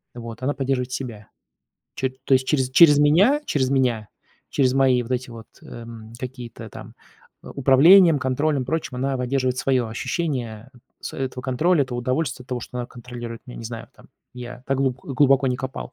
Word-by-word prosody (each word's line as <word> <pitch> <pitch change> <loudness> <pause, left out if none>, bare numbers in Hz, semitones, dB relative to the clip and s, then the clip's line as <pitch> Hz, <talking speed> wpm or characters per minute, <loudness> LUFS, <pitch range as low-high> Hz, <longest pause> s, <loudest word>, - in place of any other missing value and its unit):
вот, 115 0 -8
она 140 +3 0
поддерживает 130 -2 -2
себя 115 -6 -6 0.7
чёт 130 0 -1
то 135 - +4
есть, 130 0 +2
через 130 -3 +1
через 145 +1 +7
меня, 195 - +4
через 130 - 0
меня, 125 -6 +1 0.4
через 130 -3 +2
мои 130 -2 +3
вот 120 - -11
эти 125 0 -2
вот, 115 -1 -11
эм, 115 -1 -10
какие-то 120 -3 -8
там, - - -11 0.5
управлением, 150 +5 +6
контролем, 140 +1 0
прочим, 140 -1 -3
она 135 +1 -1
поддерживает 125 0 -1
свое 130 -3 +1
ощущение 120 -2 -3 0.3
с - - -7
этого 130 -1 -4
контроля, 145 +6 +2
этого 125 -2 -4
удовольствия 130 +1 -2
от - - -34
того, 125 -1 -3
что 125 - -9
она 120 - -3
контролирует 120 -1 -9
меня. 125 - -9
Не 115 - -8
знаю, 115 0 -7
там, - - -19 0.3
я 125 0 -9
так 135 - 0
глуб 135 -2 0
глубоко 135 0 +3
не 125 - -1
копал. 130 +1 -6
130 Hz, 175 wpm, -23 LUFS, 120-135 Hz, 0.7 s, через